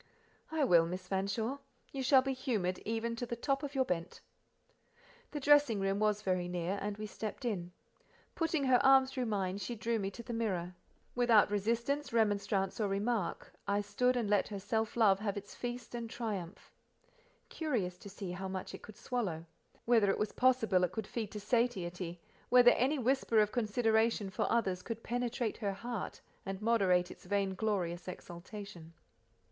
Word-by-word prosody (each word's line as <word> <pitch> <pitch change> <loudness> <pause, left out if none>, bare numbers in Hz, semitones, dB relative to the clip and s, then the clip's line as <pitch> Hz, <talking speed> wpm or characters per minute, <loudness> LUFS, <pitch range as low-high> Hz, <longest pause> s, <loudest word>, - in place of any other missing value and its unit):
"I 315 -2 +1
will, 170 -9 +5
Miss 185 +1 -5
Fanshawe: 200 +8 -1 0.3
you 270 - -4
shall 260 0 +5
be 270 0 -1
humoured 215 -9 -1
even 230 +1 -2
to 245 - -3
the 235 - -3
top 275 +3 0
of 285 -1 -5
your 260 -1 +3
bent." 170 -3 -3 1.1
The 295 - -4
dressing 290 -6 +5
room 195 +1 0
was 210 0 +1
very 185 -2 0
near, 180 +2 -2
and 205 0 -3
we 215 - -5
stepped 215 +4 -6
in. 180 -7 -2 0.6
Putting 325 -3 0
her 260 -2 +4
arm 270 0 +7
through 260 -2 -3
mine, 195 -2 -1
she 240 +3 -4
drew 230 +1 -1
me 195 -1 -1
to 235 +4 -9
the 240 - -6
mirror. 185 -6 -2 0.4
Without 235 -4 +4
resistance 235 +8 0
remonstrance, 205 -3 +1
or 210 - +2
remark, 200 0 -2
I 200 +1 +2
stood 250 +5 +1
and 235 -3 0
let 205 -1 +2
her 205 - -5
self 220 +3 -1
love 200 -4 +5
have 205 -1 -2
its 205 0 -7
feast 245 0 -6
and 235 -1 -4
triumph: 205 -7 -5 0.8
curious 220 - -2
to 200 - -10
see 195 -2 -6
how 190 +2 -4
much 190 0 -5
it - - -8
could 215 -1 -12
swallow—whether 210 0 -1
it - - +2
was 210 - -1
possible 230 -8 +3
it 180 0 0
could 220 +1 -3
feed 220 -1 -4
to 210 - -4
satiety—whether 205 +1 +2
any 270 +5 +2
whisper 255 -3 +2
of 210 0 +3
consideration 220 -2 +1
for - - -1
others 195 -6 +1
could 230 +3 -6
penetrate 240 -1 -2
her 200 -3 -2
heart, 230 +1 -5 0.2
and 195 0 -4
moderate 195 -5 +2
its - - -13
vainglorious 190 -2 -1
exultation. 175 -1 -9
215 Hz, 170 wpm, -33 LUFS, 190-240 Hz, 1.1 s, arm